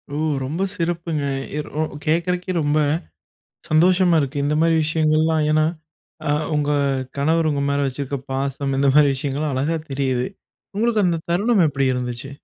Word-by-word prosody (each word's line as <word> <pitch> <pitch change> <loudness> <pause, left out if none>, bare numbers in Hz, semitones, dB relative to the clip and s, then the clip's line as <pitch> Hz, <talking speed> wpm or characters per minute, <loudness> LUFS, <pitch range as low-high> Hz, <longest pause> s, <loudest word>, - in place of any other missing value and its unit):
ஓ! - - -2 0.3
ரொம்ப 155 +8 -3
சிறப்புங்க. 170 -3 -2 0.3
எ - - 0
ரொ 155 - -4 0.2
கேட்கறதுக்கே 175 +3 0
ரொம்ப 145 +1 +1 0.9
சந்தோஷமா 175 +2 +4
இருக்கு. 140 +1 -3
இந்த 145 +1 +1
மாரி 165 0 +3
விஷயங்கள்லாம் 155 0 +2
ஏன்னா, 155 0 +3 0.6
அ - - +3 0.2
உங்க 145 -1 0 0.5
கணவர் 160 +3 +2
உங்க 140 -1 -1
மேல 140 0 +1
வச்சிருக்க 140 +1 -4 0.2
பாசம் 135 0 -2
இந்த 140 0 +4
மாரி 150 -1 +6
விஷயங்கள்லாம் 140 +2 -2
அழகா 150 +5 0
தெரியுது. 130 -2 0 0.5
உங்களுக்கு 220 -1 +2
அந்த 170 -2 +1
தருணம் 200 +2 +3
எப்டி 135 -2 0
இருந்துச்சு? 125 +1 -4
150 Hz, 145 wpm, -21 LUFS, 140-165 Hz, 0.9 s, மாரி